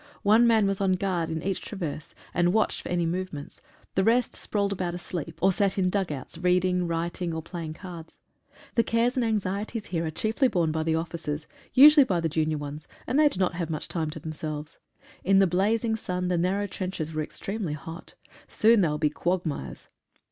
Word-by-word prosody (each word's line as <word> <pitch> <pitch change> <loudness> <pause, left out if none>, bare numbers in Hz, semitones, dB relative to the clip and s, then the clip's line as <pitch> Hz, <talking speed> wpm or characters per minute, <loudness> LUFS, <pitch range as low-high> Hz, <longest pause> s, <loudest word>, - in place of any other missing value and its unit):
One 220 +4 +6
man 220 -3 +4
was 195 0 -1
on 190 -1 +3
guard 180 -3 -1
in 160 0 -3
each 195 -1 -1
traverse, 165 -7 -6 0.2
and 175 +1 +2
watched 220 0 +1
for - - -8
any 175 -1 +1
movements, 170 -3 -4 0.3
the 190 - +2
rest 235 +3 +3
sprawled 200 -1 -1
about 180 -2 -3
asleep, 170 -2 -5
or 190 - +6
sat 195 +1 +1
in 185 -1 +2
dug 195 -4 0
outs, 145 +3 -6
writing, 180 0 +2
reading, 170 0 -2
or 160 - -4
playing 165 -2 -6
cards. 170 -3 -10 0.5
The 230 - +4
cares 230 +2 +1
and 255 - +1
anxieties 210 0 -2
here 170 -3 -2
are - - -2
borne 155 - -4
chiefly 225 +5 +2
by 160 -7 0
the 160 0 +1
officers, 160 -2 -3 0.3
usually 295 +2 +9
by 185 -9 0
the 165 -1 0
junior 155 0 0
ones, 145 +1 -7 0.2
and 270 - +1
they 305 -1 +6
do 190 - -7
not 185 -2 +2
have 170 -2 -3
much 155 -2 -3
time 160 -3 -2
to 160 +1 -7
themselves. 155 -1 -6 0.4
In 195 +1 +4
the 195 - +6
blazing 215 +6 +1
sun 180 -4 -3
the 180 - +2
narrow 190 +4 +1
trenches 185 -5 -4
were 155 - -1
extremely 195 +2 -4
hot 165 +3 -9 0.2
— - - -21
soon 225 -1 +4
they 175 - +3
will 150 - -1
be 150 -1 +1
quag 175 +3 -1
mires. 65 - -5
180 Hz, 205 wpm, -27 LUFS, 160-200 Hz, 0.5 s, usually